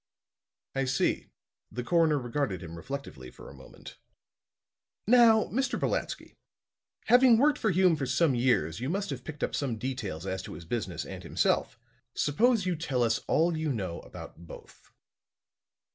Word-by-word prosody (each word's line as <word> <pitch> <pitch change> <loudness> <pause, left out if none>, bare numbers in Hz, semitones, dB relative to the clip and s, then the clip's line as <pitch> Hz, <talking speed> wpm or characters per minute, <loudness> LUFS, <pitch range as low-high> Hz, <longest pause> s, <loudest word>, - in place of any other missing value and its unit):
"I 135 0 0
see." 130 0 0 0.4
The 125 - -4
coroner 165 +1 +3
regarded 120 - -2
him 85 -1 -8
reflectively 85 - -7
for - - -14
a - - -11
moment. - - -13 1.1
"Now, 225 -1 +6
Mr. 265 +3 -1
Brolatsky, - - -3 0.7
having 245 -1 +6
worked 290 +4 +3
for 220 - +1
Hume 185 -1 +4
for 140 -4 -3
some 140 +3 +2
years, 120 -9 +1
you 130 +3 -3
must 195 0 -2
have 125 -2 -6
picked 155 +1 -7
up - - -1
some 130 -6 -2
details 105 -9 -4
as 95 -1 -3
to - - -9
his 80 +2 -10
business 95 -4 -3
and - - -8
himself. - - 0 0.4
Suppose 220 - +2
you 180 -1 0
tell 140 -6 -1
us 115 -1 +1
all 170 +1 +2
you 155 -1 -1
know 95 -8 -3
about 85 +1 -11
both." - - -14
135 Hz, 160 wpm, -29 LUFS, 110-175 Hz, 1.1 s, Now